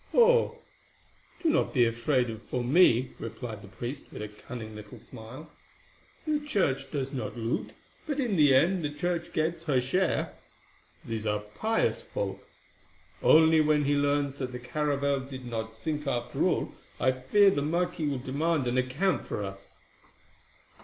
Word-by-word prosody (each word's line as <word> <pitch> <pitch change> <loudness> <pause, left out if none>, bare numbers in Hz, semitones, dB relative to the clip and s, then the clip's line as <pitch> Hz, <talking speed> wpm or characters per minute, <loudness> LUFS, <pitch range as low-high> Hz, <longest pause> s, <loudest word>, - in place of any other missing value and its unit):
"Oh, 485 0 +5 0.9
do 330 - +3
not 305 - +1
be 120 -2 +5
afraid 120 +1 0
for 125 - -1
me," 130 -3 +4
replied 115 -1 -6
the 100 - -12
priest 120 +7 -6
with - - -6
a - - -4
cunning 110 +1 -9
little 105 -1 -10
smile. 130 +6 -11 0.7
"The 305 -1 +1
Church 145 - 0
does 135 -1 -3
not 125 -2 -4
loot; 115 +1 -2 0.3
but 290 -1 -2
in 240 -7 0
the 145 -5 +6
end 170 +5 +3
the 150 - 0
Church 170 +3 -2
gets 165 0 -1
her 140 -5 +2
share. 175 +9 0 0.7
These 110 -2 -3
are 105 0 +1
a - - -7
pious 215 - 0
folk. - - -4 0.8
Only 160 0 +6
when 150 -1 +3
he 145 +1 +2
learns 145 -1 +1
that 130 -2 -3
the - - -3
caravel 140 +1 0
did 130 -1 -8
not 110 -2 -4
sink 150 +6 -4
after 120 -3 -1
all, - - 0 0.3
I 130 +3 +3
fear 165 +11 +4
the 145 - 0
marquis 170 +1 0
will 140 -2 -1
demand 140 +3 0
an 125 +1 +1
account 140 +8 0
of - - -12
us." 95 0 -9
140 Hz, 160 wpm, -28 LUFS, 120-160 Hz, 0.9 s, the